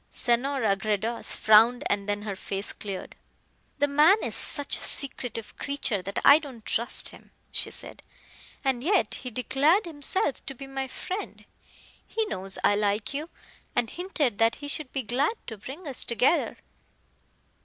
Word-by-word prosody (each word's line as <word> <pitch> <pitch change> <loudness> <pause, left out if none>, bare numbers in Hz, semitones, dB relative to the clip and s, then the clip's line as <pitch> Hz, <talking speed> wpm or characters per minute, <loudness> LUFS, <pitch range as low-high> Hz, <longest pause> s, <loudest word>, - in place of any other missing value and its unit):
Senora 240 -3 +1
Gredos 215 +3 -1
frowned 225 +3 +5
and 200 0 -1
then 205 0 -1
her 205 -2 -4
face 195 +1 -2
cleared. 195 -3 -6 0.6
"The 290 0 +2
man 300 +8 +6
is - - -2
such 285 -2 +3
a - - -5
secretive 245 -5 +1
creature 275 -8 -2
that 195 +2 -6
I 285 +2 +9
don't 260 -8 -11
trust 235 +1 -1
him," - - -16 0.2
she - - -2
said; - - -9 0.6
"and 260 -2 0
yet 380 +4 +2
he 255 - -4
declared 270 - +2
himself 295 -2 -2
to 275 - -5
be 275 - -9
my 270 0 -4
friend. 370 +9 -6 0.6
He 445 0 -1
knows 190 - -4
I 205 - +4
like 210 +3 0
you, 300 +4 -4 0.5
and 240 -2 0
hinted 315 - -1
that 225 0 +4
he 290 - -8
should 285 -1 -2
be 270 - -2
glad 270 - 0
to 225 - -6
bring 270 - -9
us 270 - -2
together." 250 +7 +2
255 Hz, 160 wpm, -27 LUFS, 215-290 Hz, 0.6 s, I